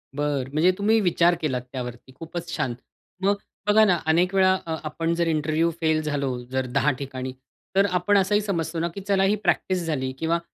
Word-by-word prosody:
बरं. 145 -3 -1
म्हणजे 160 +5 +4
तुम्ही 220 +2 +3
विचार 175 -2 +3
केलात 130 -6 -1
त्यावरती. 125 0 -7
खूपच 170 +1 -6
छान. 120 - -1 0.5
मग 200 +1 +3 0.3
बघा 215 +1 +6
ना 180 -3 +3
अनेक 175 +4 +3
वेळा 185 -1 +5
अ, 160 -1 -2
आपण 165 +2 -2
जर 170 0 0
इंटरव्ह्यू 155 +1 +1
फेल 160 -1 +2
झालो 140 -4 -2
जर 130 0 0
दहा 130 +4 +1
ठिकाणी, 130 -1 -5 0.4
तर 195 +1 +5
आपण 180 +3 +2
असंही 205 +2 +3
समजतो 170 -5 -2
ना 170 - 0
की 200 - -5
चला 195 -1 +3
ही 200 +2 +3
प्रॅक्टिस 185 -3 +1
झाली 130 -5 -1
किंवा 165 +1 +1
165 Hz, 190 wpm, -24 LUFS, 145-185 Hz, 0.5 s, बघा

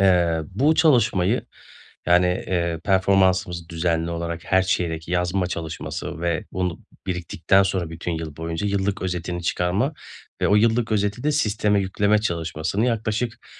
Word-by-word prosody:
eee, 90 -4 +3
bu 140 +12 +3
çalışmayı, 120 - +3 0.6
yani, 90 +1 +5
eee, 85 -2 -1
performansımızı 95 -3 +2
düzenli 85 0 0
olarak 85 0 -4
her 95 0 +3
çeyrek 85 -3 -1
yazma 90 +1 0
çalışması 80 -2 -5
ve 85 0 -1
bunu 90 -3 -2 0.3
biriktikten 90 +1 +2
sonra 90 -4 -2
bütün 85 +1 -4
yıl 80 -2 -5
boyunca 80 +4 -3
yıllık 100 0 -1
özetini 90 -1 -3
çıkarma 90 - 0 0.5
ve - - +3
o 105 - +5
yıllık 115 +1 +2
özeti 105 +3 0
de 150 - +2
sisteme 105 -7 +1
yükleme 100 +2 +2
çalışmasını 85 +1 -1
yaklaşık, 115 0 -2
90 Hz, 135 wpm, -23 LUFS, 85-105 Hz, 0.6 s, yani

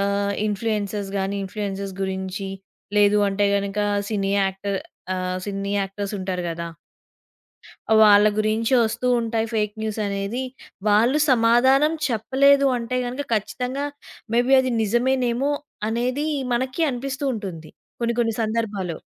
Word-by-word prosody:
ఆహ్, 200 0 0
ఇన్‌ఫ్లుయెన్సర్స్ 205 -1 -2
గాని, 195 +1 -1
ఇన్‌ఫ్లుయెన్సర్స్ 195 0 -4
గురించి, 190 +1 -3 0.5
లేదు 205 0 +5
అంటే 200 +1 +1
గనుక 200 0 -2 0.3
సినీ 195 -2 0
యాక్టర్ 195 +1 -2 0.4
ఆహ్, 185 0 -2
సినీ 200 0 -3
యాక్టర్స్ 200 +1 -4
ఉంటారు 185 -1 -3
గదా! 170 0 -4 1.3
వాళ్ళ 210 -1 +7
గురించి 220 +3 +1
వస్తూ 230 +2 -1
ఉంటాయి 225 -1 -1
ఫేక్ 210 -2 0
న్యూసనేది, 210 +2 -2 0.5
వాళ్ళు 230 +7 +4
సమాధానం 260 +5 +4 0.2
చెప్పలేదు 275 +4 +3
అంటే 240 +1 -3
గనుక, 255 +4 -3
ఖచ్చితంగా 250 +6 -2 0.5
మే 235 - +5
బీ 270 - +6
అది 255 -1 -1
నిజమేనేమో 245 +4 +1 0.4
అనేది 250 +6 -1 0.3
మనకీ 260 +6 -1
అనిపిస్తూ 270 +2 -4
ఉంటుంది 180 -7 -6 0.3
కొన్ని 235 0 +1
కొన్ని 230 -1 +1
సందర్భాలో. 215 -6 -2
215 Hz, 120 wpm, -23 LUFS, 200-240 Hz, 1.3 s, వాళ్ళ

